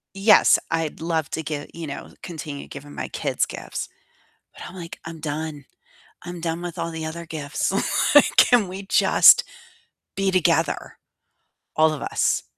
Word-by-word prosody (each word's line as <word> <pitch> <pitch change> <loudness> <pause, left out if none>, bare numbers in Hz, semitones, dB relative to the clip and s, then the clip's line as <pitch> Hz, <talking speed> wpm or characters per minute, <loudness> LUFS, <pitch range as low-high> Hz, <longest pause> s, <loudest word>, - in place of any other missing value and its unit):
Yes, 205 +2 +6
I'd 165 -2 -2
love 160 -2 -2
to 160 - -3
give 145 -2 -5
you 165 -1 -7
know, 140 - -7
continue 155 -4 -7
giving 145 +1 -10
my - - -5
kids - - -1
gifts, - - -6 0.7
but - - -11
I'm 185 - -12
like, 170 -2 -9
"I'm 165 0 -8
done. 150 -2 -5 0.6
I'm 175 -1 -7
done 165 +1 -3
with 175 -2 -6
all 165 - -3
the 160 -1 -5
other 170 +2 -6
gifts." 150 0 -3 0.4
Like, 290 - +6
can 240 -6 +5
we 190 +2 -7
just 195 - +6 0.7
be 195 -1 0
together, 185 -2 0 0.8
all 155 0 +4
of 150 - -6
us? - - 0
165 Hz, 160 wpm, -23 LUFS, 155-175 Hz, 0.8 s, Yes